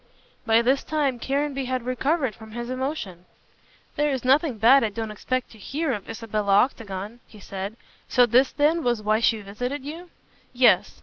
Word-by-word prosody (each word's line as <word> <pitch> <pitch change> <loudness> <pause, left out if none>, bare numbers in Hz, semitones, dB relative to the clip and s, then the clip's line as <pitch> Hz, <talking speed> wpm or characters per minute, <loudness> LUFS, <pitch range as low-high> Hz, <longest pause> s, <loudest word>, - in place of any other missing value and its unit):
By 225 +1 +4
this 265 +3 +2
time 285 -5 -1
Caranby 275 +1 -1
had 255 -1 -2
recovered 265 +1 0
from 220 +1 -13
his 240 +1 -5
emotion. 255 - -4 0.7
"There 295 0 +1
is 265 -3 -3
nothing 270 -1 +3
bad 240 +5 +6
I 220 - +1
don't 220 +1 -5
expect 255 +4 -3
to 220 - -15
hear 285 - -2
of 205 -4 -6
Isabella 215 -3 -2
Octagon," 210 -2 -1
he 215 - -15
said, 195 +2 -6 0.3
"so 250 -1 +4
this 250 +3 +3
then 305 +3 +2
was 240 -3 0
why 215 +1 +2
she 225 -1 +2
visited 245 +8 -5
you?" 335 +4 -8 0.4
"Yes. 245 0 +3
245 Hz, 175 wpm, -24 LUFS, 220-275 Hz, 0.7 s, bad